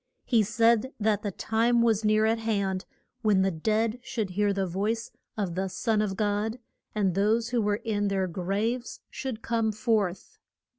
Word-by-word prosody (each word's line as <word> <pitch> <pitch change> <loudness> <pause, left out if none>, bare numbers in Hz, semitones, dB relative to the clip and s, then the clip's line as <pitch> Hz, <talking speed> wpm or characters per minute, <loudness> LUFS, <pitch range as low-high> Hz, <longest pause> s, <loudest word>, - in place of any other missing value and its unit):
He 230 -3 +4
said 230 +4 +2
that 210 -1 +1
the 210 - -2
time 230 +4 +1
was 225 -2 +2
near 215 0 +3
at 225 +1 +2
hand 200 -4 -1 0.4
when 205 -4 +3
the 190 - +2
dead 220 +7 0
should 220 -6 -3
hear 205 +2 +1
the 195 -1 0
voice 210 +6 -2 0.3
of 195 -5 -1
the 190 +2 -1
Son 215 +3 0
of 200 -2 -1
God, 210 +2 0 0.4
and 195 -4 +1
those 220 +5 +2
who 240 -1 +1
were 205 0 0
in 205 -2 0
their 195 -1 +1
graves 200 +8 -2
should 245 -4 -5
come 230 -1 +1
forth. 210 -4 -1
215 Hz, 175 wpm, -27 LUFS, 195-225 Hz, 0.4 s, He